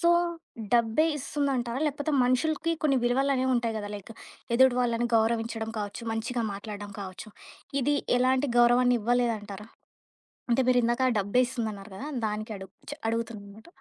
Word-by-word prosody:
So 340 Hz, -, +3 dB, 0.6 s
డబ్బే 235 Hz, +5 st, +3 dB
ఇస్తుందంటారా? 270 Hz, -3 st, -1 dB
లేకపోతే, 290 Hz, +1 st, -2 dB
మనుషులకి 310 Hz, +6 st, +1 dB
కొన్ని 275 Hz, -3 st, +3 dB
విలువలనేవి 260 Hz, +1 st, +2 dB
ఉంటాయి 235 Hz, -2 st, 0 dB
గదా! 205 Hz, -1 st, -4 dB
లైక్ 205 Hz, +2 st, -9 dB, 0.4 s
ఎదుటు 260 Hz, 0 st, +6 dB
వాళ్ళను 240 Hz, -1 st, +1 dB
గౌరవించడం 225 Hz, 0 st, 0 dB
కావచ్చు, 205 Hz, +2 st, -5 dB
మంచిగా 230 Hz, +2 st, -2 dB
మాట్లాడడం 205 Hz, 0 st, -7 dB
కావచ్చు. 190 Hz, +2 st, -8 dB, 0.5 s
ఇది 290 Hz, +3 st, +2 dB, 0.2 s
ఎలాంటి 255 Hz, +2 st, +2 dB
గౌరవాన్ని 245 Hz, +1 st, +5 dB
ఇవ్వలేదంటారా? 215 Hz, -3 st, -1 dB, 0.9 s
అంటే, 260 Hz, -, +4 dB
మీరిందాక 245 Hz, 0 st, +2 dB
ఆ -, -, +1 dB
డబ్బేస్తుందన్నారు 220 Hz, -1 st, -1 dB
కదా! 280 Hz, +8 st, -6 dB, 0.2 s
దానికి 215 Hz, +1 st, -4 dB
అడుగు 190 Hz, 0 st, -11 dB, 0.2 s
చ్ 290 Hz, -, -8 dB
అడుగుతుందనమాట. 220 Hz, -1 st, -5 dB
235 Hz, 130 wpm, -28 LUFS, 215-255 Hz, 0.9 s, ఎదుటు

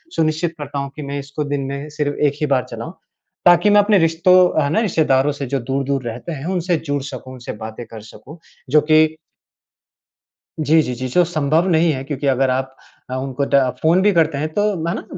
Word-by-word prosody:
सुनिश्चित 160 Hz, +1 st, 0 dB
करता 145 Hz, -1 st, -5 dB
हूँ 140 Hz, 0 st, -4 dB
कि 155 Hz, -, -7 dB
मैं 140 Hz, 0 st, -4 dB
इसको 140 Hz, +2 st, -5 dB
दिन 145 Hz, -1 st, -2 dB
में 140 Hz, +2 st, -6 dB
सिर्फ़ 145 Hz, -1 st, -2 dB
1 140 Hz, -, -1 dB
ही -, -, +2 dB
बार 125 Hz, -, -1 dB
चलाऊँ। -, -, -7 dB, 0.5 s
ताकि 175 Hz, +4 st, +6 dB
मैं 205 Hz, 0 st, +6 dB
अपने 205 Hz, 0 st, +3 dB
रिश्तों, 170 Hz, 0 st, +4 dB
है 140 Hz, -, 0 dB
ना, 190 Hz, -, +1 dB
रिश्तेदारों 150 Hz, -, +2 dB
से 140 Hz, -1 st, -5 dB
जो 135 Hz, +1 st, -1 dB
दूर-दूर 135 Hz, +2 st, -2 dB
रहते 120 Hz, +8 st, -6 dB
हैं 145 Hz, -1 st, -6 dB
उनसे 180 Hz, 0 st, 0 dB
जुड़ 145 Hz, -1 st, -1 dB
सकूँ, 130 Hz, -2 st, -8 dB
उनसे 125 Hz, -2 st, -8 dB
बातें 110 Hz, +2 st, -8 dB
कर 110 Hz, -1 st, -11 dB
सकूँ। 140 Hz, +8 st, -13 dB, 0.3 s
जो 150 Hz, +2 st, +5 dB
कि 155 Hz, 0 st, +6 dB, 1.5 s
जी, 155 Hz, +2 st, +4 dB
जी, 125 Hz, -, -3 dB
जी। 130 Hz, +2 st, -4 dB
जो 175 Hz, +8 st, +3 dB
संभव 160 Hz, +1 st, 0 dB
नहीं 165 Hz, 0 st, +3 dB
है, 130 Hz, -, -5 dB
क्योंकि 140 Hz, 0 st, -4 dB
अगर 135 Hz, 0 st, +2 dB
आप 130 Hz, +1 st, -2 dB, 0.4 s
अ, -, -, -2 dB
उनको 135 Hz, +1 st, -2 dB
द -, -, 0 dB, 0.3 s
फ़ोन 170 Hz, +4 st, +3 dB
भी 205 Hz, +1 st, +4 dB
करते 160 Hz, -4 st, +2 dB
हैं 155 Hz, +2 st, -1 dB
तो 205 Hz, -, +1 dB, 0.2 s
है 170 Hz, -, 0 dB
ना, -, -, -6 dB
145 Hz, 215 wpm, -19 LUFS, 135-165 Hz, 1.5 s, ताकि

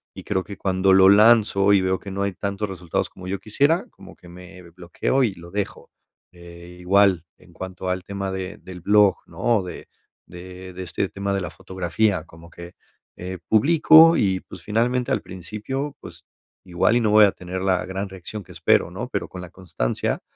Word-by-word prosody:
y -, -, -9 dB
creo 95 Hz, -1 st, -2 dB
que 100 Hz, -, -8 dB
cuando 95 Hz, 0 st, +2 dB
lo 95 Hz, 0 st, +7 dB
lanzo 105 Hz, -2 st, +5 dB
y 95 Hz, -, +4 dB
veo 95 Hz, 0 st, 0 dB
que 100 Hz, -, -9 dB
no 100 Hz, +1 st, -2 dB
hay 100 Hz, -, -1 dB
tantos 100 Hz, +2 st, -4 dB
resultados 90 Hz, -3 st, -3 dB
como 90 Hz, 0 st, -12 dB
yo 95 Hz, 0 st, -3 dB
quisiera, 140 Hz, -, +1 dB
como -, -, -15 dB
que 90 Hz, -, -17 dB
me 90 Hz, +1 st, -13 dB
bloqueo 90 Hz, +10 st, -1 dB
y 105 Hz, -5 st, 0 dB
lo 85 Hz, 0 st, -13 dB
dejo. 100 Hz, -1 st, -5 dB, 0.4 s
Eh, 85 Hz, 0 st, -13 dB
igual, 95 Hz, -2 st, +3 dB
en 90 Hz, -1 st, -21 dB
cuanto 95 Hz, +1 st, -6 dB
al 90 Hz, 0 st, -2 dB
tema 100 Hz, -1 st, -5 dB
de 95 Hz, +2 st, -5 dB
del 90 Hz, -2 st, -11 dB
blog, 105 Hz, +1 st, +4 dB
¿no? 115 Hz, -5 st, 0 dB
De 90 Hz, -, -9 dB, 0.4 s
de 90 Hz, +1 st, -11 dB
de 95 Hz, +1 st, -7 dB
este 90 Hz, +2 st, -3 dB
tema 100 Hz, 0 st, -3 dB
de 100 Hz, -, -1 dB
la 90 Hz, -, -4 dB
fotografía, 95 Hz, 0 st, -1 dB
como 85 Hz, 0 st, -16 dB
que 85 Hz, 0 st, -12 dB, 0.4 s
eh, 90 Hz, 0 st, -7 dB
publico 160 Hz, +6 st, +6 dB
y, 95 Hz, -2 st, +1 dB
pues, -, -, -11 dB
finalmente, 120 Hz, +3 st, 0 dB
al -, -, 0 dB
principio, 110 Hz, +10 st, -6 dB
pues, -, -, -13 dB, 0.4 s
igual 90 Hz, +5 st, +1 dB
y 120 Hz, -, +3 dB
no 110 Hz, -, +1 dB
voy 105 Hz, 0 st, +7 dB
a 100 Hz, -, +2 dB
tener 90 Hz, +1 st, -6 dB
la 95 Hz, -2 st, 0 dB
gran 95 Hz, +1 st, -4 dB
reacción 95 Hz, +2 st, -8 dB
que -, -, -16 dB
espero, -, -, +2 dB
¿no? -, -, -6 dB
Pero -, -, -3 dB
con 90 Hz, -, -9 dB
la 90 Hz, -, -9 dB
constancia, 85 Hz, -10 st, -3 dB
95 Hz, 195 wpm, -22 LUFS, 90-105 Hz, 0.4 s, lo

